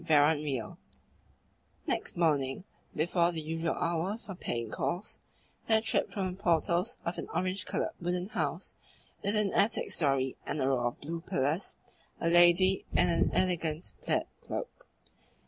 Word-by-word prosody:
CHAPTER 155 -1 +4
IX 130 -6 -3 1.1
Next - - -1
morning, 145 -3 +1 0.3
before 170 +2 +2
the 165 - -4
usual 165 +1 -2
hour 170 +5 -1
for 210 -4 -8
paying 115 -10 -3
calls, 180 +5 -2 0.5
there 220 -1 +5
tripped 220 0 0
from 190 -3 -2
the 185 +2 -11
portals 175 +6 +2
of 170 - -2
an - - -5
orange 185 +1 -1
coloured - - -1
wooden 180 +2 -1
house - - -2 0.5
with 200 +2 0
an 210 -2 +2
attic 215 +3 +2
storey 135 -4 +1
and 150 - -3
a 130 - +1
row 125 -3 +2
of 120 - -5
blue 165 +3 -4
pillars 165 0 -1 0.4
a 165 - +1
lady 175 +2 +5
in 180 - +4
an 170 - +3
elegant 170 -3 0
plaid - - +1 0.2
cloak. - - -6
170 Hz, 150 wpm, -31 LUFS, 150-185 Hz, 1.1 s, there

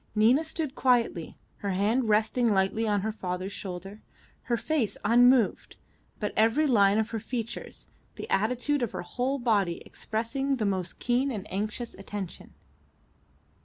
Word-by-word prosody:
Nina 235 +8 +4
stood 315 -3 -3
quietly, 240 - +1 0.2
her 200 -2 -2
hand 220 +5 +1
resting 220 +2 +3
lightly 195 +4 +1
on 205 -2 +1
her 220 +2 -1
father's 185 -2 -4
shoulder, 195 +2 -7 0.4
her 240 -2 +1
face 280 -5 -1
unmoved, 245 0 +4 0.4
but 210 - -2
every 230 +8 +3
line 205 -6 +4
of 220 0 0
her 225 - -2
features, 230 +1 -6 0.3
the - - -7
attitude 250 +7 +1
of 240 - -2
her - - -4
whole 250 +9 -1
body 205 -9 +1
expressing 235 +6 -2
the 225 -5 -1
most 190 -3 -2
keen 250 +3 +1
and 210 -6 -4
anxious 215 +4 -3
attention. 195 - -7
220 Hz, 145 wpm, -28 LUFS, 200-250 Hz, 0.4 s, Nina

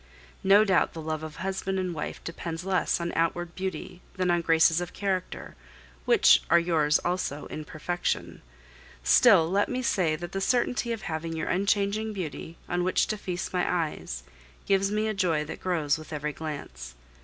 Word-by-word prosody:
No 200 +3 +6
doubt 190 -3 +2
the 165 - -7
love 155 0 -3
of 155 -1 -7
husband 190 +1 -3
and 185 -2 -2
wife 150 - -5
depends 165 0 -5
less 190 -2 +1
on 170 0 -3
outward 170 +1 0
beauty 185 -1 -5
than 185 -2 +1
on 175 0 +2
graces 165 0 +4
of 175 - -6
character, 190 -2 -3 0.5
which - - +6
are 170 - +6
yours 160 -3 +3
also 175 -5 -2
in 155 - -6
perfection; 175 +4 -3 0.6
still, 190 - +6
let 195 +4 +1
me 255 0 -2
say 175 -9 +1
that 175 +2 -7
the 195 - -3
certainty 245 +1 +1
of 225 -4 -4
having 165 0 -4
your 160 -1 -3
unchanging 200 +3 +1
beauty, 165 -3 -6
on 175 0 0
which 185 - +2
to 215 - -2
feast 185 -3 -5
my 180 -1 +1
eyes, 155 - -3 0.4
gives 195 0 +2
me 215 +1 0
a 215 - 0
joy 170 -6 +1
that 160 - -8
grows 160 -4 0
with 155 - -11
every 150 -1 -3
glance. 60 - -7
175 Hz, 180 wpm, -27 LUFS, 160-195 Hz, 0.6 s, No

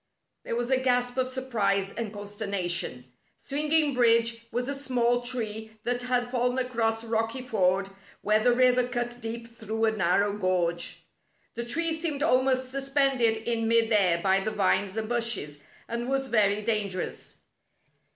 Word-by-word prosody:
There - - -4
was 240 +2 -2
a 260 - +3
gasp 245 -1 +1
of 260 0 +1
surprise 210 -7 -1
and 230 -3 -4
consterna 205 -2 -4
tion. 125 -8 -2 0.3
Swinging 300 +1 +1
Bridge 230 -1 +2
was 245 +1 -2
a 280 - -1
small 245 -3 0
tree 220 -3 -2
that 245 0 -1
had 245 0 -1
fallen 250 0 0
across 230 -3 -1
Rocky 225 +2 -2
Ford 195 -5 +1 0.4
where 215 +1 +3
the 245 - +5
river 250 0 +3
cut 240 0 -4
deep 230 +1 -5
through 225 -1 -3
a 220 - +2
narrow 200 0 +1
gorge. 180 -3 -1 0.5
The 235 - -4
tree 330 +7 +2
seemed 315 -3 -2
almost 260 -2 +2
suspended 270 -4 +1
in 230 -1 0
mid 230 0 +3
air 190 -5 +4
by 190 0 +3
the 195 - -2
vines 200 -1 0
and 220 -1 -2
bushes, 230 -11 0 0.3
and 235 +2 -4
was 270 0 -1
very 210 -2 +2
dangerous. 205 -4 -2
230 Hz, 155 wpm, -27 LUFS, 210-255 Hz, 0.5 s, the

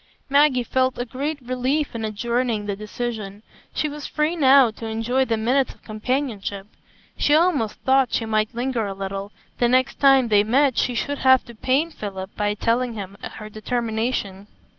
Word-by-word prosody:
Maggie 280 -3 +4
felt 260 +2 0
a 245 - -2
great 285 +5 -4
relief 255 +4 -1
in 230 -1 -4
adjourning 230 +1 -1
the 200 -1 -2
decision. 215 -1 -5 0.3
She 305 - -1
was 295 0 -6
free 305 +2 0
now 270 -5 +6
to 225 +1 -8
enjoy 230 +4 0
the 230 -3 0
minutes 255 +5 +1
of - - -30
companionship; 215 -3 -3 0.5
she 295 - +3
almost 310 - +2
thought 265 -1 +3
she 225 - 0
might 215 +1 0
linger 240 -3 -1
a 195 - -5
little; 195 +1 -5 0.3
the 240 - +3
next 260 +2 +2
time 270 -3 +5
they 205 -1 +5
met 260 +4 +3
she 245 +2 0
should 285 +4 -2
have 260 -1 +5
to 235 - -11
pain 270 +8 0
Philip 195 -7 -7
by 210 0 0
telling 235 +2 0
him 200 -2 -7 0.2
her 215 - -8
determination. 220 -2 -3
240 Hz, 175 wpm, -23 LUFS, 215-265 Hz, 0.5 s, now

